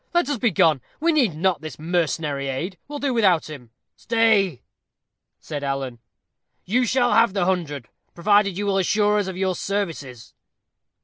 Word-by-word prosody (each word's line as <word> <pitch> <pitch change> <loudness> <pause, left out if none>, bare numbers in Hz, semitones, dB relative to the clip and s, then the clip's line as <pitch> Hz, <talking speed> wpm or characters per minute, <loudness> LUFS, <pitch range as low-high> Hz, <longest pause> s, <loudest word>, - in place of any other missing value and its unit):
"Let 345 -6 +3
us 285 -5 -1
be 240 - +3
gone. 165 - +3 0.2
We 335 +2 +2
need 255 - +2
not 175 -1 0
his 155 - -7
mercenary 155 -4 -1
aid. 165 +7 -4
We 295 - -10
will - - -3
do 280 -2 -1
without 185 -9 +2
him." 125 -6 -10 0.3
"Stay," 220 - +1 0.8
said 145 -2 -6
Alan, 135 -3 -3 0.7
"you 245 +7 +1
shall 245 -1 +2
have 230 -2 +4
the 195 -3 0
hundred, 155 - -2 0.3
provided 200 +1 +2
you 205 - -2
will 195 -1 +1
assure 210 +2 +2
us 200 - -2
of 190 -1 -5
your 190 -1 0
services." 165 - -4
185 Hz, 170 wpm, -23 LUFS, 155-210 Hz, 0.8 s, have